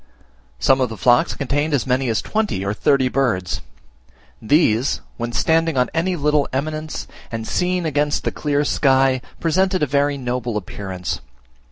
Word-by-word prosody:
Some 135 - +3
of 125 - +1
the 115 - -7
flocks 120 +9 +3
contained 145 +2 0
as 125 - -1
many 130 0 +1
as 110 - 0
twenty 215 - -1
or 100 - 0
thirty 130 +4 +2
birds. 120 -9 0 0.8
These, 125 -1 +2 0.2
when 120 0 -3
standing 165 +3 +1
on 125 -1 +2
any 175 +3 0
little 150 -2 +1
eminence, 155 +3 -3 0.2
and 115 -1 -4
seen 180 -1 0
against 145 -1 0
the - - -1
clear 145 -1 0
sky, 135 -2 +3 0.2
presented 185 +2 +1
a - - +5
very 140 +1 +1
noble 125 -3 -2
appearance. 95 -2 -5
135 Hz, 155 wpm, -20 LUFS, 120-155 Hz, 0.8 s, a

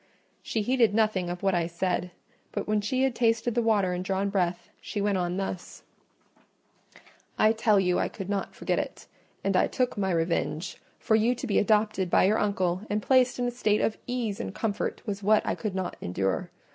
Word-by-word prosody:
She 220 - -2
heeded 235 -3 +3
nothing 215 -5 +1
of 175 +1 -5
what 195 -1 +2
I 170 -2 +1
said; 180 +1 -1 0.4
but 205 - -4
when 210 0 +1
she 255 +6 0
had 265 -2 +2
tasted 230 0 +1
the 240 - +2
water 205 -5 +2
and 180 0 -3
drawn 195 +1 -1
breath, 180 -3 -1
she 210 - -4
went 200 -1 +1
on 175 0 -1
thus— 190 -2 -5 1.5
"I 215 - +5
tell 220 -2 +3
you 180 -2 +2
I - - 0
could 195 -3 -7
not 200 -1 -3
forget - - -1
it; - - -5 0.4
and 195 -1 +1
I - - +4
took 250 -4 -1
my 190 -1 0
revenge: 165 -1 -1 0.2
for 220 - +1
you 230 +3 +3
to 255 - -5
be 215 - +2
adopted 210 -3 +2
by - - +4
your 205 +4 +3
uncle, 185 -3 0
and 210 - +1
placed 255 -2 +3
in 245 - -1
a 245 - 0
state 215 -3 +1
of 220 - 0
ease 240 -5 -2
and 95 -1 -5
comfort, 210 -2 -2
was 205 -2 -3
what 215 +2 +3
I - - 0
could 210 -4 -4
not 185 -2 -3
endure. 95 +2 -1
205 Hz, 205 wpm, -27 LUFS, 185-220 Hz, 1.5 s, I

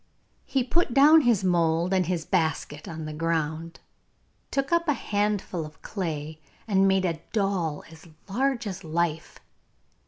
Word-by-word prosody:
He 265 -2 +1
put 265 0 0
down 300 +3 +8
his 235 -7 +2
mould 170 0 +2
and 185 -3 +2
his 175 -3 -2
basket 160 -4 -1
on 160 -1 -6
the 155 - -5
ground, 165 0 -2 0.7
took 275 +2 -1
up 340 0 +2
a 295 - +4
handful 205 -7 -1
of 155 0 -12
clay, 155 -5 -4 0.3
and 195 -2 +3
made 190 -1 +2
a 165 -3 -2
doll 195 -8 0
as 160 +1 -14 0.2
large 255 +4 0
as 195 -2 -5
life. 160 0 -2
180 Hz, 150 wpm, -26 LUFS, 160-210 Hz, 0.7 s, down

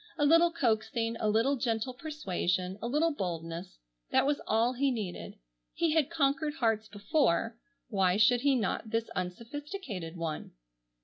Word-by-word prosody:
A 295 - +2
little 330 +3 +6
coaxing, 230 -5 0
a 215 - +1
little 230 +6 +3
gentle 235 +1 -1
persuasion, 190 - -2
a 235 - -2
little 300 +6 +2
boldness—that 165 - -3
was 285 0 +1
all 230 +3 +2
he 275 +2 +1
needed. 215 -8 -4 0.4
He 330 -2 +2
had 315 -3 +2
conquered 295 -1 +1
hearts 225 -5 +1
before, 225 - 0 0.3
why 195 -5 +2
should 240 +3 +5
he 280 0 +3
not 220 -1 -1
this 225 +1 -1
unsophisticated 215 - -5
one? 165 -2 -4
230 Hz, 140 wpm, -30 LUFS, 190-285 Hz, 0.4 s, little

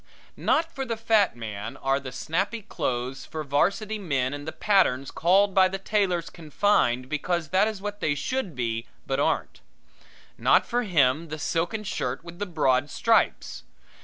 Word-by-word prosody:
Not 330 +1 +1
for 270 - -3
the 230 -3 -3
fat 220 - +3
man 110 -1 -6
are 135 +1 0
the 130 -2 -8
snappy 195 - -2
clothes 130 - -3
for 155 -1 -6
varsity 200 +9 0
men 135 -8 -1
and 145 +1 -7
the - - -2
patterns 165 -12 +2
called 195 +4 +3
by 190 0 +6
the 190 +1 -4
tailors 195 -4 0
confined 150 -6 +1
because 155 +3 -2
that 190 +3 +3
is 210 -3 -5
what 205 0 -4
they 145 -6 0
should 190 - -3
be 115 -1 -2 0.2
but 135 - -1
aren't. - - -1 0.8
Not - - +4
for 245 0 0
him 160 - +2
the 155 0 -5
silken 170 +7 -1
shirt 135 -8 -3
with 170 +1 -11
the 205 - -2
broad 145 -5 +1
stripes. 230 +7 +1
170 Hz, 165 wpm, -26 LUFS, 135-205 Hz, 0.8 s, by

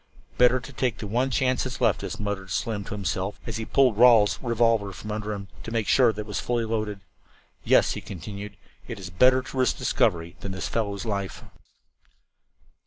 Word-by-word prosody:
"Better 125 +1 +5
to 130 +3 -11
take 125 -3 -1
the - - -6
one 120 +6 0
chance 130 -1 +1
that's 130 -1 -5
left - - +2
us," - - -5
muttered 100 -2 -4
Slim 105 +2 -2
to 105 - -5
himself, 95 0 -3
as 115 -2 -4
he 110 - -4
pulled 125 -5 +3
Rawle's 115 -5 +6
revolver 115 -4 +1
from 105 +3 -7
under 105 0 -3
him, 100 -1 -5
to - - -7
make 115 -2 -1
sure 125 -4 +5
that 105 0 -6
it - - -8
was 105 - -3
fully 120 -1 -1
loaded. 110 -3 -3 0.6
"Yes," - - +4
he - - -4
continued, 100 +3 -8 0.3
"it's 95 -2 -7
better 130 +8 +4
to 135 - -8
risk 130 - +2
discovery 85 0 0
than 95 - -5
this 95 - -4
fellow's 100 -3 -2
life." 100 -3 -3
105 Hz, 190 wpm, -25 LUFS, 100-120 Hz, 0.6 s, Rawle's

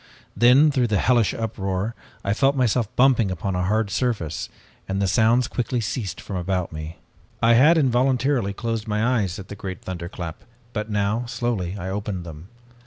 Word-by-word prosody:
Then 130 +6 +6
through 130 -3 +1
the 105 -2 +1
hellish 120 +1 +3
uproar, 100 -1 -3 0.3
I 100 - +2
felt 135 +5 +2
myself 125 -3 +2
bumping 125 -5 +4
upon 90 +1 -3
a 90 - 0
hard 105 +1 0
surface, 95 - -2 0.4
and 95 0 -2
the 100 - +1
sounds 110 +5 +3
quickly 125 0 -2
ceased 110 - -3
from 95 - -5
about 90 0 -2
me. 80 +2 -7 0.4
"I 115 +1 +4
had 150 +8 +6
involuntarily 130 -4 +2
closed 115 +1 -3
my 110 +4 +1
eyes 95 -3 -2
at 100 -2 -9
the 105 - -6
great 95 -2 -7
thunderclap, 85 -2 -6 0.3
but 105 0 -3
now, 105 +3 0
slowly, 110 -6 -2
I 95 -1 -5
opened 100 -2 -3
them. 80 +1 -10
105 Hz, 175 wpm, -23 LUFS, 95-120 Hz, 0.4 s, Then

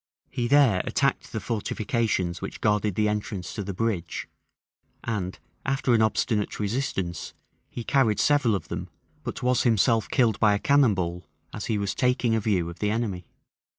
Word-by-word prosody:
He 120 -3 -1
there 125 -9 +5
attacked 140 -1 0
the 110 - -3
fortifications 105 -4 -1
which - - -6
guarded 105 -2 +1
the 105 +2 +2
entrance 105 -3 -3
to 105 - -4
the 100 - -4
bridge; 95 -4 -2 0.8
and, 100 -6 -3 0.3
after 135 -2 +1
an 115 - +4
obstinate 110 -1 0
resistance, 100 -5 -2 0.3
he 120 - -6
carried 115 -5 +2
several 145 -7 +3
of 95 - -5
them; - - -5 0.3
but - - -5
was 125 -1 +3
himself 115 -1 +3
killed 115 -6 +2
by 105 -1 +4
a - - +1
cannon 135 -1 +4
ball 85 -2 -3 0.3
as 105 - -5
he 110 - 0
was 100 -2 -1
taking 125 -2 +1
a 115 - +3
view 100 -5 0
of 85 - -8
the 105 - 0
enemy. 105 -5 -2
110 Hz, 170 wpm, -26 LUFS, 100-120 Hz, 0.8 s, there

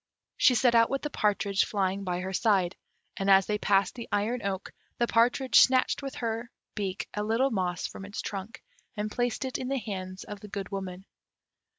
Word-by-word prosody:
She 250 - +5
set 240 +1 +4
out 230 -1 +5
with 275 - -2
the 295 - -3
partridge 200 -3 +1
flying 195 -1 -1
by 180 -1 -2
her 190 +1 -4
side; 190 -4 +2 0.4
and 195 0 0
as 195 -1 +7
they 210 0 -1
passed 195 -1 +2
the 235 -2 -8
iron 225 +4 0
oak, 195 -2 -4 0.2
the 240 - +2
partridge 245 +3 +4
snatched 255 +1 +4
with 275 -1 -6
her 230 0 -3 0.2
beak 195 -3 -3
a 210 - -2
little 230 +6 +1
moss 180 -4 -1
from - - -7
its 200 +1 -7
trunk, 200 +2 -6 0.3
and 210 +1 -2
placed 245 +2 -1
it 260 - -3
in 255 - -4
the 275 +1 0
hands 185 -5 -5
of 205 -1 -8
the 210 - -10
Good 195 -1 -5
Woman. 190 -1 -6
210 Hz, 200 wpm, -28 LUFS, 195-235 Hz, 0.4 s, as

